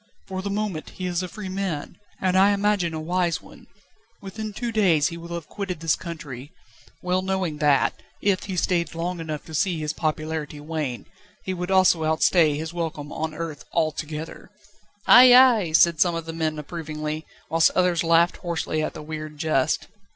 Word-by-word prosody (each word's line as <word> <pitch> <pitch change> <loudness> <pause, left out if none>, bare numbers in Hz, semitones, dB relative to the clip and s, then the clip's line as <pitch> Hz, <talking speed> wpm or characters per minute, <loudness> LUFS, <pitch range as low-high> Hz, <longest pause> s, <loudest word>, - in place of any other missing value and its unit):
For 190 -1 -4
the 200 - -4
moment 200 -5 -3
he 185 - -7
is 175 0 -1
a 185 - -4
free 205 +3 -8
man, 185 -5 -4 0.2
and 185 -1 +1
I 195 +2 +5
imagine 200 -5 +1
a - - -3
wise 175 +1 0
one; - - -16 0.5
within 215 +2 -6
two 235 +3 -4
days 180 -10 +3
he 170 - -7
will 170 0 -7
have 170 -3 -6
quitted 195 -5 -5
this 165 -1 +1
country, 145 -5 -8 0.5
well 180 +1 +1
knowing 190 -4 -2
that, 145 -2 +2 0.2
if 195 -2 0
he 190 -2 -4
stayed 170 -2 0
long 175 +1 -3
enough 155 -2 -5
to 160 - -11
see 180 +2 +1
his 155 0 -2
popularity 155 -1 -3
wane, 150 -5 -4 0.4
he 190 - -3
would 180 0 -4
also 185 -4 +4
outstay 160 -1 +3
his 160 +2 -5
welcome 160 -4 -4
on 160 0 -3
earth 160 -3 -5
altogether." 155 -1 -3 0.6
"Ay! 250 0 +9
Ay!" 240 -9 +6
said 165 -1 +4
some 175 -2 +3
of 165 -1 -4
the 165 - -6
men 160 -1 -2
approvingly, 155 0 -5 0.2
whilst 165 0 +5
others 180 -2 +2
laughed 170 +1 +3
hoarsely 165 -2 -2
at 155 - -3
the - - -7
weird 155 0 -7
jest. 155 -4 0
165 Hz, 180 wpm, -24 LUFS, 155-185 Hz, 0.6 s, Ay